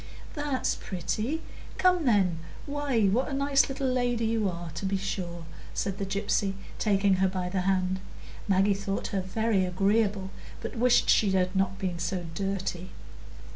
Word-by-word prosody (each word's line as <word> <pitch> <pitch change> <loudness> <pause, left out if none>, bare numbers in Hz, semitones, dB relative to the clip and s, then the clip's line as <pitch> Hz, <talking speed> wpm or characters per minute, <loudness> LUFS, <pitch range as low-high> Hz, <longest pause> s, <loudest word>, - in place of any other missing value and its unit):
"That's 290 -3 0
pretty; 215 - -3 0.3
come, 360 -3 +3
then. 190 -8 +3 0.3
Why, 285 -6 +1
what 225 +9 +2
a - - -4
nice 275 0 +3
little 270 0 -3
lady 245 -3 +1
you 220 -3 +1
are, 170 -2 -6
to 155 - -6
be 195 0 +1
sure!" 175 -3 -4 0.3
said 195 -1 -2
the 195 - -2
gypsy, 195 0 0 0.2
taking 200 -2 +3
her 190 +1 +3
by 185 -1 -2
the 185 0 0
hand. 185 0 +1 0.5
Maggie 195 +1 +4
thought 195 0 -3
her 195 - +1
very 205 +1 +1
agreeable, 195 +1 +1 0.3
but - - -6
wished 245 +1 +4
she 200 -4 +4
had 185 0 +1
not 190 0 +1
been 180 -3 -3
so 175 +1 -2
dirty. 190 -1 -3
195 Hz, 160 wpm, -28 LUFS, 185-230 Hz, 0.5 s, Maggie